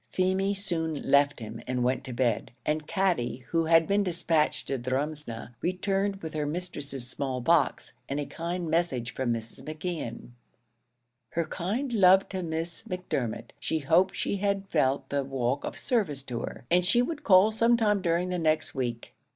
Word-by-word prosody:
Feemy 190 +2 +1
soon 165 -6 -1
left 140 0 +3
him, 110 -2 -7
and 125 -1 0
went 125 +1 +1
to 130 - -4
bed, 120 -3 0 0.2
and 150 0 -1
Katty, 130 -10 0
who 165 -1 +1
had 165 0 +5
been 200 +3 +2
dispatched 165 -4 +1
to 135 - -1
Drumsna, 130 -2 -3
returned 195 +2 -1
with 160 - -5
her 150 -1 -1
mistress's 145 -6 -4
small 130 0 -2
box, 160 +4 +2 0.2
and 140 +2 -1
a 145 - -2
kind 170 +3 -4
message 155 -8 0
from 130 -2 -1
Mrs. 115 +3 -4
McKeon: 155 -6 -5 1.0
"Her 170 0 0
kind 215 - -2
love 190 -2 +6
to 190 -1 -3
Miss 165 0 -3
Macdermot; 125 - -3
she 160 +2 -1
hoped 165 +6 +3
she 200 - -1
had 200 0 -1
felt 140 -3 +1
the 140 -1 0
walk 135 0 -1
of - - -5
service 170 - 0
to 125 -3 -4
her, 120 - -6
and 180 +1 +5
she 240 +7 +4
would 300 +2 -4
call 200 -2 +6
some 230 +2 +3
time 210 -3 +2
during 175 0 +1
the 180 -1 -1
next 155 -1 +1
week." 120 -3 -3
160 Hz, 175 wpm, -28 LUFS, 135-185 Hz, 1.0 s, love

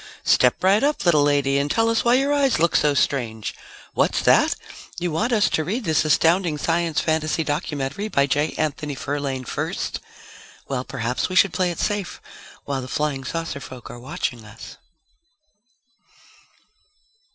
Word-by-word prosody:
Step 125 +6 +3
right 195 +6 +4
up, 295 -6 0
little 160 -4 +5
lady 140 -1 +2
and 140 +1 -1
tell 225 +8 +2
us 230 0 +1
why 240 +1 +4
your 275 +2 +2
eyes 280 -2 +2
look 170 +1 +2
so 150 -1 +3
strange! 115 -7 -1 0.4
What's - - +1
that? - - +4 0.4
You 175 -1 -2
want 220 +11 0
us 215 -3 +3
to 160 - +1
read 215 - -3
this 160 -5 +2
astounding 165 +2 +2
science 165 +1 0
fantasy 160 0 0
documentary 145 +4 -3
by 140 -9 +2
J. 145 +2 0
Anthony 150 -1 -2
Ferlaine 140 -2 -3
first? - - -3 0.7
Well 130 -2 -2
perhaps 125 +1 -2
we 185 - -4
should 190 -1 +5
play 185 -1 +1
it 175 - -5
safe 205 -3 -2 0.5
while 140 -2 -2
the 130 - -7
flying 145 0 -2
saucer 165 +1 -4
folk 130 -2 -10
are 120 - -10
watching 120 -1 -4
us! 110 +1 -12
150 Hz, 160 wpm, -22 LUFS, 135-180 Hz, 0.7 s, little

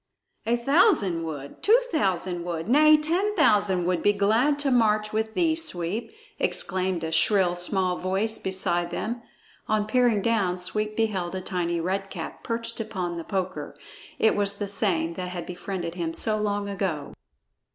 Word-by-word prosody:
"A 235 +1 +2
thousand 235 - +3
would! 145 -3 -7
Two 450 +4 +5
thousand 185 - -1
would 170 -1 -4
Nay! 305 +5 +6
ten 355 +8 0
thousand 205 - +3
would 180 -2 0
be 205 - +3
glad 225 +8 +2
to 290 -2 0
march 215 -3 +2
with 220 0 -2
thee, 330 -3 +2
Sweep!" 225 - 0 0.3
exclaimed 185 -2 -1
a 160 - -3
shrill 180 +2 +3
small 180 0 0
voice 195 +4 -1
beside 175 -2 +1
them. 235 +7 -4 0.5
On 215 -1 +1
peering 230 -2 +2
down, 200 -6 +1
Sweep 215 +4 -2
beheld 190 -6 -1
a 185 - -3
tiny 175 -2 -2
Red 195 +3 -2
Cap 170 -4 -7
perched 230 0 -3
upon 185 -6 -4
the 165 - -5
poker; 185 0 -4 0.4
it 220 - +3
was 200 -1 +1
the 205 - -3
same 180 -5 0
that 180 +1 -5
had 180 -1 -6
befriended 180 -1 -5
him 165 -2 -4
so 215 - +1
long 205 -1 -1
ago. 185 -7 -3
200 Hz, 160 wpm, -25 LUFS, 180-225 Hz, 0.5 s, Nay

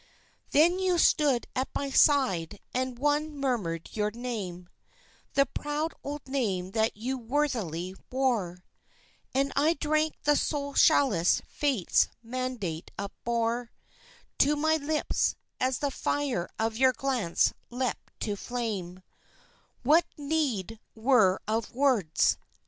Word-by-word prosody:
Then 340 +5 +4
you 370 -2 +2
stood 290 -6 +3
at 260 +1 0
my 280 -1 -2
side 205 - +3
and 255 -1 -2
one 295 +2 0
murmured 215 - -2
your 210 -1 +1
name, 210 -7 -5 0.7
The 275 - +5
proud 295 +3 -3
old 290 0 -6
name 200 -9 -1
that 220 0 0
you 255 +4 -3
worthily 225 - -1 0.2
wore, 220 -10 -1 0.7
And 275 +1 +1
I 310 +4 +3
drank 310 +1 0
the 295 0 +4
soul 285 -1 -1
chalice 235 - +4
Fate's 270 - +2 0.2
mandate 230 -9 -4
upbore 230 +3 -2 0.7
To 295 +2 +4
my 315 +2 +2
lips, 305 +1 0 0.2
as 255 0 +1
the 285 -2 -1
fire 270 -11 -1
of 225 0 -1
your 260 +1 +5
glance 250 -11 +1 0.2
leapt 250 0 -4
to 205 -2 -1
flame; 200 -6 -4 0.8
What 310 +7 +5
need 280 - -1 0.2
were 220 -5 +4
of 220 +1 -2
words? 240 - +2
255 Hz, 120 wpm, -28 LUFS, 210-285 Hz, 0.8 s, The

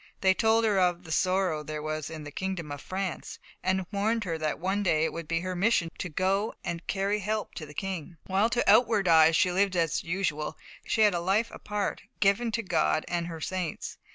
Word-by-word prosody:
They 190 -1 +5
told 225 +2 +3
her 205 -3 +3
of 180 -1 +2
"the 160 - -9
sorrow 185 -2 +1
there 150 0 -5
was 155 0 -3
in 160 -1 -7
the 145 - -8
kingdom 185 -5 -4
of 145 0 -6
France," 190 -2 -4 0.2
and 185 0 0
warned 220 +3 0
her 170 -4 -2
that 155 -1 -1
one 190 +4 -1
day 160 -5 +2
it - - -2
would 165 -2 -6
be 165 +1 0
her 185 0 -3
mission 180 -3 +2
to 180 - -3
go 195 +6 0
and 170 0 -5
carry 200 +2 0
help 215 +2 -2
to 155 - -7
the 145 - -13
King. 180 -3 -5
While 195 +4 +2
to 240 0 0
outward 225 -6 +5
eyes 160 -1 +6
she 180 - +3
lived 190 +1 +1
as 165 -3 +1
usual, 165 -4 -2 0.3
she 220 - +1
had 210 -2 +6
a 175 - 0
life 200 +6 +1
apart, 210 -1 -3 0.2
given 210 +4 +2
to 230 +2 -1
God 160 -4 +1
and 170 -1 -2
her 165 -2 -6
saints. 180 0 -4
185 Hz, 215 wpm, -28 LUFS, 165-200 Hz, 0.3 s, eyes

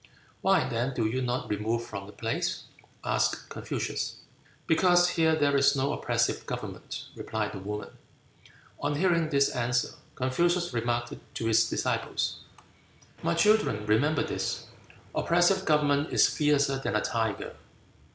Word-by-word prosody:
"Why, - - +3
then, 125 +3 -2
do 115 - 0
you 125 +4 0
not 125 0 -2
remove 110 +3 -1
from 100 -4 -7
the - - -10
place?" 115 +1 -2 0.4
asked - - 0
Confucius. - - -3 0.5
"Because 175 +1 +4
here 160 -2 +3
there 145 -2 +2
is 140 +1 +4
no 140 +2 0
oppressive - - 0
government," - - -6
replied 110 -1 -3
the 100 - -7
woman. 105 +2 -5 0.9
On 145 0 -1
hearing 170 -1 +2
this 140 -2 +3
answer, 125 0 0 0.3
Confucius 170 +6 +1
remarked 120 0 -1 0.2
to 115 - -3
his 110 -1 +3
disciples, - - -1 0.8
"My 85 - 0
children 210 - +3
remember 135 +9 +2
this, - - -3 0.5
oppressive 175 +3 +2
government 145 -1 +2
is - - +5
fiercer 140 -3 +2
than 135 - -2
a 105 - +2
tiger." 110 -3 -2
135 Hz, 135 wpm, -28 LUFS, 115-155 Hz, 0.9 s, is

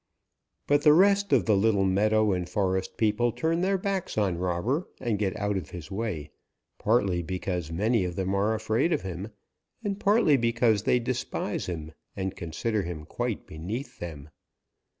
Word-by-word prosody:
But 145 0 +3
the 150 0 +7
rest 200 +3 +4
of 125 -10 +4
the 105 - +4
little 100 -1 +3
meadow 105 +3 +3
and 90 -1 -2
forest 95 -2 -1
people 110 +2 +2
turn 165 +7 0
their 195 +1 +2
backs 190 - -3
on 95 -5 +1
Robber 95 - -1
and 115 -5 -1
get 95 -3 -1
out 105 -1 0
of 80 -7 -5
his 90 +2 -9
way, 95 -9 -3 0.5
partly 100 -6 +2
because 90 -1 -3
many 105 +5 +1
of 90 -1 -3
them 95 +1 -1
are 105 +3 +2
afraid 110 +9 +1
of - - -1
him, 95 +1 -5 0.6
and 200 -1 -2
partly 205 -9 +4
because 115 -3 +2
they 125 - +3
despise 130 +1 -3
him 80 -3 -5 0.2
and 95 0 -3
consider 100 +6 -2
him 85 -4 -6
quite - - -3
beneath 115 - -6
them. 75 -4 -7
105 Hz, 170 wpm, -27 LUFS, 90-120 Hz, 0.6 s, the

